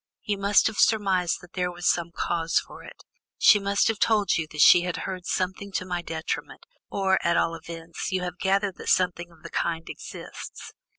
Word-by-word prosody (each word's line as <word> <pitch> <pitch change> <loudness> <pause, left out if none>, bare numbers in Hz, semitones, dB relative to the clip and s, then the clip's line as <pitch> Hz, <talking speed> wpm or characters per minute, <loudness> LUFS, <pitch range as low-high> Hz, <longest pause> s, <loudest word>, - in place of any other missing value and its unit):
You 205 -1 -2
must 200 0 +4
have 220 - -1
surmised 190 -5 +2
that 175 - -16
there 180 -1 -1
was 175 0 -4
some 170 0 +2
cause 165 -1 -1
for - - -3
it; - - -13 0.3
she 210 - +6
must 200 0 +1
have 225 -1 -1
told 210 -4 +3
you 160 -2 -1
that 155 - -9
she 175 - +8
had 180 -1 -3
heard 185 -2 -5
something 190 +2 -2
to 185 - -2
my 180 -1 -3
detriment, 160 -1 -5 0.2
or, 190 -1 +1
at 170 0 +2
all 165 - +1
events, 165 +1 -7
you 185 -1 -1
have 180 0 -5
gathered 195 0 0
that - - -5
something 175 -2 +1
of 165 0 -21
the 170 - -9
kind 165 -1 -2
exists? - - -9
180 Hz, 200 wpm, -26 LUFS, 170-195 Hz, 0.3 s, she